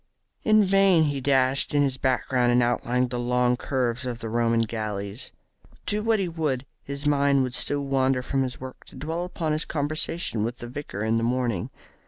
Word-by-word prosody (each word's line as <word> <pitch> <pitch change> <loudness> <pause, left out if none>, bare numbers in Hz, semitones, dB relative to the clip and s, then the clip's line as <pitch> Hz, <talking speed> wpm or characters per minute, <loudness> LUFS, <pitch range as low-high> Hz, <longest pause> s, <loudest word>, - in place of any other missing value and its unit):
In 215 -1 +4
vain 195 -3 +4
he 145 -3 -1
dashed 135 +1 +2
in 145 - +4
his 135 -2 0
background 130 -2 +1
and 120 0 +4
outlined 120 +1 0
the 125 - -2
long 125 0 +2
curves 125 -1 -1
of 125 -2 -3
the 115 -1 -6
Roman 115 0 +2
galleys. 105 -2 -4 0.5
Do 210 +1 0
what 225 0 +2
he 195 -3 -1
would, 150 -6 -2 0.2
his 140 +1 -6
mind 140 -2 +3
would 125 -1 -3
still 145 +2 +1
wander 135 -1 +1
from 135 +2 -1
his 130 -1 -3
work 130 0 -9
to - - -15
dwell 165 +4 -3
upon 165 -3 -3
his 155 +1 0
conversation 155 -5 -1
with 120 +2 -3
the 120 - -7
vicar 125 -5 -6
in 110 +1 +1
the 115 - 0
morning. 120 -5 -1
130 Hz, 195 wpm, -25 LUFS, 120-145 Hz, 0.5 s, In